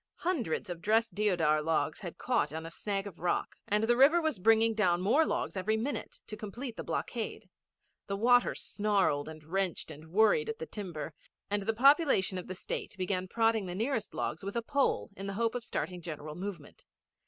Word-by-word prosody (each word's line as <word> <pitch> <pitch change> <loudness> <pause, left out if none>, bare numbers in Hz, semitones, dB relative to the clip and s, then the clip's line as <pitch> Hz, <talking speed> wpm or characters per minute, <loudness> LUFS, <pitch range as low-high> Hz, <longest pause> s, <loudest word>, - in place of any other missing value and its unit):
Hundreds 310 - -1
of 175 -2 -6
dressed 220 +2 +2
deodar 175 -7 +2
logs 160 +1 0
had - - -7
caught - - +1
on 160 +1 -5
a 165 - -7
snag 195 +2 -3
of 195 -4 -9
rock, 175 +1 -1
and 210 +1 +2
the 240 +2 +4
river 280 +7 +6
was 315 - -1
bringing 225 +3 +4
down 180 -5 +2
more 235 - +3
logs - - -2
every 215 +3 0
minute 265 +6 -4
to 215 - -7
complete 230 +4 -6
the - - -5
blockade. - - -3 0.6
The 200 - -2
water 245 +3 +4
snarled 195 -9 0
and 155 -1 -10
wrenched 185 +2 -2
and 155 +2 -11
worried 220 - +4
at 450 - -3
the 475 - -5
timber, 175 - -6 0.4
and 205 0 +1
the 220 +3 0
population 270 - +4
of 180 - -8
the 185 - -5
State 195 - -5
began 185 0 -1
prodding 225 -1 +2
the 175 - -4
nearest 225 +1 -2
logs 160 - -3
with 200 +2 -5
a 235 - 0
pole 245 - +1
in 195 +1 -6
the 195 - -3
hope 230 0 +1
of 245 -1 -3
starting 180 -3 -3
a - - -13
general 155 -2 -6
movement. 175 -3 -7
205 Hz, 200 wpm, -31 LUFS, 175-230 Hz, 0.6 s, river